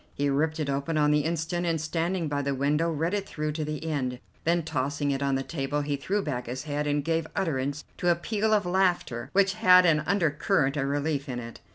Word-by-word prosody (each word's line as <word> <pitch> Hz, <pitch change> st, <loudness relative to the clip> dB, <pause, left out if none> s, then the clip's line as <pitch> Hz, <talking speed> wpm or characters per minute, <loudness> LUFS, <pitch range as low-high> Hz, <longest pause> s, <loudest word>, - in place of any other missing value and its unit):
He 140 Hz, 0 st, +1 dB
ripped 160 Hz, +3 st, 0 dB
it 150 Hz, -, -1 dB
open 140 Hz, +3 st, -1 dB
on 150 Hz, 0 st, +4 dB
the 150 Hz, -, +4 dB
instant, 165 Hz, +3 st, -1 dB
and, 165 Hz, -2 st, 0 dB
standing 165 Hz, +3 st, -1 dB
by 145 Hz, -1 st, -1 dB
the 140 Hz, 0 st, -1 dB
window, 150 Hz, +5 st, +1 dB
read 165 Hz, +3 st, -1 dB
it 200 Hz, -1 st, -2 dB
through 150 Hz, 0 st, -2 dB
to 155 Hz, +1 st, -3 dB
the 150 Hz, +1 st, -4 dB
end, 135 Hz, -6 st, -2 dB, 0.3 s
then, 170 Hz, +1 st, +2 dB
tossing 145 Hz, -1 st, -1 dB
it 135 Hz, 0 st, -2 dB
on 140 Hz, -1 st, +1 dB
the 135 Hz, -, -1 dB
table, 145 Hz, -1 st, -2 dB
he 145 Hz, 0 st, -1 dB
threw 195 Hz, +9 st, -1 dB
back 125 Hz, -7 st, -3 dB
his 130 Hz, +3 st, -4 dB
head 150 Hz, 0 st, -2 dB
and 145 Hz, -1 st, 0 dB
gave 165 Hz, -1 st, 0 dB
utterance 145 Hz, -4 st, -1 dB, 0.2 s
to 175 Hz, -, +2 dB
a 170 Hz, -, +5 dB
peal 215 Hz, +5 st, -1 dB
of 210 Hz, -3 st, +3 dB
laughter 175 Hz, -10 st, 0 dB
which 195 Hz, 0 st, +4 dB
had 185 Hz, -4 st, +6 dB
an 160 Hz, -3 st, +4 dB
undercurrent 160 Hz, -5 st, +1 dB
of 135 Hz, -2 st, 0 dB
relief 145 Hz, 0 st, -1 dB
in 125 Hz, -, -3 dB
it. 115 Hz, -1 st, -7 dB
150 Hz, 230 wpm, -27 LUFS, 140-170 Hz, 0.3 s, had